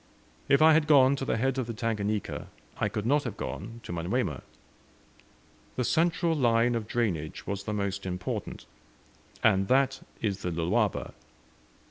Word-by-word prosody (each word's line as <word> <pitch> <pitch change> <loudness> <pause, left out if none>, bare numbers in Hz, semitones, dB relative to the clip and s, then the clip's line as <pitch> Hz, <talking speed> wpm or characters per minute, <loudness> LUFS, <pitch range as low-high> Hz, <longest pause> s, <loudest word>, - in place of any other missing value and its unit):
If 140 +3 +5
I 160 0 +8
had 155 -1 +3
gone 140 -2 +6
to 135 - -3
the - - 0
head 135 +3 0
of 125 - -2
the 115 - -5
Tanganika, 110 -2 -2 0.3
I - - +1
could 105 - -4
not 145 +5 +3
have 115 -5 -5
gone, 115 +3 -6
to 85 - -6
Manyuema. 85 0 -1 1.3
The 125 - 0
central 165 +4 +2
line 120 -4 +3
of 115 -2 -2
drainage 90 -11 -2
was 100 0 -4
the 105 - -2
most 100 -2 -2
important, 90 -8 -4 0.8
and 95 -3 +4
that 135 +2 +2 0.2
is 100 -3 -2
the 90 - -2
Lualaba. 85 0 0
115 Hz, 155 wpm, -28 LUFS, 100-135 Hz, 1.3 s, I